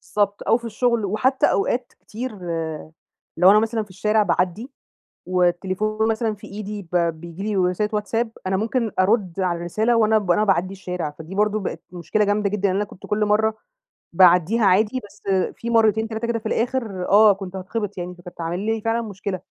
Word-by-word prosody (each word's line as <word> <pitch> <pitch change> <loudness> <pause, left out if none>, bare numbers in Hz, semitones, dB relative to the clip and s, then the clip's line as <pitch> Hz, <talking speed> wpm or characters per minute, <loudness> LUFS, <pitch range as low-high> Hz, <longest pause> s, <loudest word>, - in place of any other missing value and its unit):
بالضبط 205 -1 +1
أو 225 - +5
في 235 - -11
الشغل. 235 -1 0
وحتى 250 +7 +2
أوقات 240 +5 -1
كتير 245 +4 -6 1.1
لو 185 +3 +7
أنا 210 - +6
مثلًا 225 0 -1
في 205 - -17
الشارع 210 +3 +1
باعدي 205 +8 -1 0.6
والتليفون 185 +4 0
مثلًا 220 -1 0
في 205 - -13
إيدي 210 0 -6
ب - - +2
بيجي 170 +1 -2
لي 210 -1 -1
رسالة 185 +3 +1
واتساب، 225 +2 -1 0.2
أنا 190 0 +1
ممكن 225 +1 -1
أرد 195 -2 +1
على 180 -2 0
الرسالة 215 +8 0
وأنا 220 -1 +4
أنا 200 0 +2
باعدي 190 -2 +1
الشارع، 180 -5 -4
فدي 160 +4 -9
برضو 210 +1 +1
بقت 200 - -5
مشكلة 195 +4 0
جامدة 205 0 +1
جدًا. 200 -1 0
لإن 185 - 0
أنا 205 - +1
كنت 195 - -13
كل 210 0 +1
مرة 215 +1 +2 0.6
باعديها 180 +5 +5
عادي، 210 +7 +3
بس - - -21 0.3
في 235 - -6
مرتين 220 -1 +3
تلاتة 220 +1 -4
كده 235 -1 -1
في 220 - -25
الآخر، 225 -5 -2
آه، 210 +1 +7
كنت 190 -1 -8
هاتخبط 205 +1 -4
يعني 180 0 -5
فكانت 175 0 -16
هتعمل 175 0 -4
لي 225 -1 -1
فعلًا 225 +1 0
مشكلة. 200 -3 -5
210 Hz, 185 wpm, -22 LUFS, 185-220 Hz, 1.1 s, لو